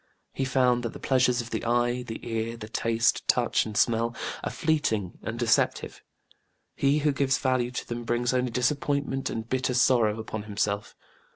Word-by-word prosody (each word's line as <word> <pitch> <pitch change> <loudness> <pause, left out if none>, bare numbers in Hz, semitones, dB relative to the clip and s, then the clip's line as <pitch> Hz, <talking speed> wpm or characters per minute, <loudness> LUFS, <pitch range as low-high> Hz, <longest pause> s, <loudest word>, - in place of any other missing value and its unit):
He 135 - -1
found 125 -2 +2
that 115 -2 -4
the - - -9
pleasures 125 -2 +2
of 120 - -10
the - - -2
eye, 120 +1 +1
the 120 -1 -7
ear, 115 0 -2
the 110 -1 -8
taste, 115 +1 +1
touch - - +2
and 105 -1 -5
smell 115 0 +2 0.3
are - - -1
fleeting 115 - -1
and 110 +1 -5
deceptive: 120 -1 +1 0.7
he 140 +1 +2
who 150 - +4
gives 135 -1 +1
value 130 -2 +1
to 125 - -5
them 120 0 -4
brings 120 +1 0
only 125 0 +1
disappointment 135 +2 -1
and 110 0 -4
bitter 130 0 -1
sorrow 115 -4 +3
upon 110 -1 -5
himself. 100 0 -2
120 Hz, 175 wpm, -27 LUFS, 115-130 Hz, 0.7 s, who